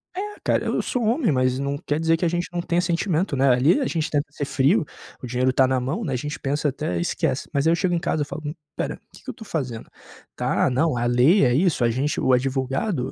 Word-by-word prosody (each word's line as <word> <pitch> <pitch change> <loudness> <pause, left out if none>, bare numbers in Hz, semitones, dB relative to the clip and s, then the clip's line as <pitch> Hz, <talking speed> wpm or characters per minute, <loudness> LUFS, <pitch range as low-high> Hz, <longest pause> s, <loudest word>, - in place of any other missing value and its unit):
É, 375 - -2 0.2
cara. - - +1
Eu - - 0
sou 250 - -2
um - - +1
homem, 240 - +1
mas 130 -1 +1
não 140 +1 -2
quer 150 -1 -2
dizer 165 0 +3
que 165 - -5
a - - +3
gente 175 +1 -1
não 175 - -1
tenha 170 0 0
sentimento, 175 -1 0
né. 135 +1 +3
Ali 130 - +4
a 270 - 0
gente 165 -1 -1
tenta 145 0 +1
ser 145 -1 -4
frio. 145 +7 +2 0.4
O - - -6
dinheiro 125 +2 +1
tá 130 +1 +3
na 130 0 +1
mão, 135 - -3
né, 145 -9 -2
a - - 0
gente 145 +4 -4
pensa, 145 +2 0
até 90 -10 -3
esquece. 85 - -1
Mas, 140 +1 0
aí, 165 - +4
eu - - +4
chego 180 0 0
em - - 0
casa, 165 -3 -1
eu - - 0
falo: 150 +1 -7
"Hum, 150 - -3 0.2
espera. - - -4
O - - -20
que - - -18
que - - -9
eu - - -4
tô 230 - -11
fazendo?". 130 - -4 0.5
Tá, - - +1
não, 140 +3 +1
a 120 - 0
lei 125 +11 +4
é 125 - +3
isso. 160 -2 +2
A 120 - +3
gente 135 +6 -1
o 130 - +2
advogado 135 - -1
145 Hz, 275 wpm, -23 LUFS, 130-170 Hz, 0.5 s, Ali